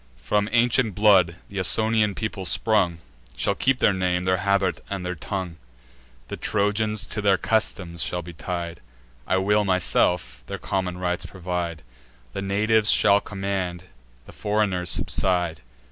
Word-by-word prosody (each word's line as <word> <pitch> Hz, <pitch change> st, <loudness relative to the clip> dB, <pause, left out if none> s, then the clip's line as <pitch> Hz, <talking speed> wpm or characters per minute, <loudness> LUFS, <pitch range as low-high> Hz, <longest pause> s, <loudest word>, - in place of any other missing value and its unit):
From 100 Hz, -, 0 dB
ancient 120 Hz, -3 st, +2 dB
blood 95 Hz, -5 st, +5 dB, 0.2 s
th' 100 Hz, -, -7 dB
Ausonian 110 Hz, +2 st, +2 dB
people 110 Hz, -3 st, -4 dB
sprung, 95 Hz, -2 st, +2 dB, 0.4 s
Shall -, -, 0 dB
keep 135 Hz, 0 st, +1 dB
their 105 Hz, -, +3 dB
name, 90 Hz, -1 st, 0 dB
their 95 Hz, 0 st, +2 dB
habit, 100 Hz, -3 st, 0 dB
and 95 Hz, -2 st, -4 dB
their 90 Hz, -, -2 dB
tongue. 90 Hz, -1 st, -5 dB, 0.7 s
The -, -, -6 dB
Trojans 105 Hz, +1 st, 0 dB
to 105 Hz, -, -4 dB
their 100 Hz, -2 st, +3 dB
customs 90 Hz, -6 st, -1 dB
shall 90 Hz, 0 st, -1 dB
be 85 Hz, +1 st, -9 dB
tied: 85 Hz, 0 st, -5 dB, 0.5 s
I 95 Hz, -, +2 dB
will, 105 Hz, +2 st, +2 dB
myself, 90 Hz, -8 st, +1 dB
their -, -, -4 dB
common 95 Hz, -2 st, -2 dB
rites 90 Hz, -1 st, -2 dB
provide; 90 Hz, -3 st, -4 dB, 0.5 s
The 100 Hz, -, -4 dB
natives 105 Hz, +2 st, +2 dB
shall 100 Hz, 0 st, +5 dB
command, 95 Hz, -3 st, -3 dB, 0.4 s
the -, -, -12 dB
foreigners 100 Hz, -4 st, 0 dB
subside. 90 Hz, -5 st, +1 dB
95 Hz, 145 wpm, -24 LUFS, 90-105 Hz, 0.7 s, blood